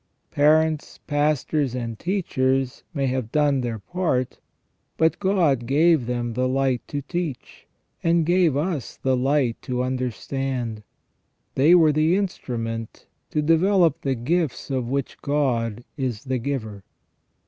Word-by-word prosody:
Parents, 155 Hz, +1 st, +2 dB
pastors, 145 Hz, -2 st, 0 dB
and 115 Hz, -3 st, -4 dB
teachers 135 Hz, -8 st, 0 dB
may 140 Hz, -5 st, -1 dB
have 130 Hz, -3 st, -2 dB
done 145 Hz, -3 st, +2 dB
their 120 Hz, -2 st, -3 dB
part, 130 Hz, -, -2 dB, 0.6 s
but 160 Hz, 0 st, +2 dB
God 170 Hz, -, +2 dB
gave 150 Hz, -1 st, +3 dB
them 120 Hz, -1 st, -2 dB
the 125 Hz, +2 st, 0 dB
light 130 Hz, -1 st, +1 dB
to 145 Hz, -1 st, -4 dB
teach, 160 Hz, -3 st, -5 dB, 0.4 s
and 165 Hz, -1 st, +3 dB
gave 175 Hz, -4 st, +3 dB
us 150 Hz, -, -3 dB
the 130 Hz, -1 st, +1 dB
light 130 Hz, -2 st, +1 dB
to 125 Hz, 0 st, -2 dB
understand; 125 Hz, -2 st, -3 dB, 0.7 s
they 150 Hz, +7 st, +5 dB
were 160 Hz, -3 st, +6 dB
the 155 Hz, +4 st, +2 dB
instrument 115 Hz, -, -4 dB, 0.2 s
to 150 Hz, -, 0 dB
develop 165 Hz, 0 st, +3 dB
the 135 Hz, -2 st, 0 dB
gifts 145 Hz, +3 st, -1 dB
of 130 Hz, -3 st, -1 dB
which 140 Hz, 0 st, -3 dB
God 120 Hz, -6 st, 0 dB
is 125 Hz, -6 st, -3 dB
the 130 Hz, -2 st, -2 dB
giver. 110 Hz, -6 st, -4 dB
135 Hz, 130 wpm, -23 LUFS, 125-160 Hz, 0.7 s, were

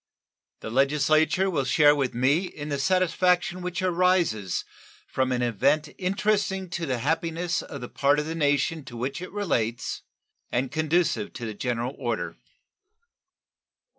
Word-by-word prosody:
The 110 Hz, -, -6 dB
Legislature 150 Hz, +7 st, +3 dB
will 160 Hz, -8 st, 0 dB
share 145 Hz, +2 st, +5 dB
with 135 Hz, -4 st, -1 dB
me 140 Hz, +9 st, +2 dB
in 150 Hz, -4 st, -7 dB
the 140 Hz, -1 st, -2 dB
satisfaction 185 Hz, +2 st, +2 dB
which 180 Hz, 0 st, -3 dB
arises 175 Hz, -, +1 dB, 0.4 s
from 130 Hz, -1 st, -1 dB
an 125 Hz, -1 st, 0 dB
event 140 Hz, +7 st, +1 dB
interesting 195 Hz, -1 st, 0 dB
to 170 Hz, -2 st, -3 dB
the 130 Hz, -2 st, 0 dB
happiness 165 Hz, +5 st, -1 dB
of 140 Hz, -, -8 dB
the 120 Hz, -, -5 dB
part 140 Hz, +3 st, +2 dB
of 150 Hz, -, 0 dB
the 160 Hz, -, -3 dB
nation 150 Hz, 0 st, +1 dB
to 120 Hz, -2 st, -9 dB
which 130 Hz, +7 st, -3 dB
it 185 Hz, -, -7 dB
relates 120 Hz, -, -1 dB, 0.5 s
and 125 Hz, +1 st, -1 dB
conducive 165 Hz, +6 st, 0 dB
to 120 Hz, -, -6 dB
the 110 Hz, -, -4 dB
general 120 Hz, +3 st, -2 dB
order. 120 Hz, -4 st, -2 dB
150 Hz, 145 wpm, -26 LUFS, 130-180 Hz, 0.5 s, share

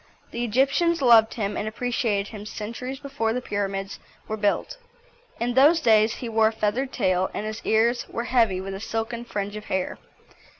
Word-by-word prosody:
The 235 Hz, -, -3 dB
Egyptians 275 Hz, +9 st, +2 dB
loved 230 Hz, -4 st, +5 dB
him 205 Hz, -3 st, -2 dB
and 215 Hz, -, -3 dB
appreciated 220 Hz, -3 st, -1 dB
him 210 Hz, -2 st, -8 dB
centuries 235 Hz, +6 st, -6 dB
before 270 Hz, -5 st, -2 dB
the 250 Hz, -, -1 dB
pyramids 195 Hz, -3 st, -3 dB, 0.3 s
were 215 Hz, -, -2 dB
built. 220 Hz, -, -1 dB, 0.6 s
In 240 Hz, +1 st, -1 dB
those 290 Hz, +6 st, +6 dB
days 220 Hz, -5 st, +4 dB
he 245 Hz, -, -6 dB
wore 220 Hz, -1 st, +3 dB
a -, -, +1 dB
feathered 225 Hz, +5 st, -1 dB
tail, 185 Hz, -5 st, +1 dB
and 210 Hz, -, -3 dB
his 215 Hz, +1 st, -5 dB
ears 235 Hz, +2 st, +2 dB
were 235 Hz, -, -3 dB
heavy 230 Hz, -7 st, +2 dB
with 195 Hz, +1 st, -5 dB
a 195 Hz, -, -5 dB
silken 225 Hz, +2 st, -4 dB
fringe 205 Hz, -2 st, -4 dB
of 215 Hz, -, -7 dB
hair. 190 Hz, -1 st, -2 dB
225 Hz, 180 wpm, -25 LUFS, 205-245 Hz, 0.6 s, those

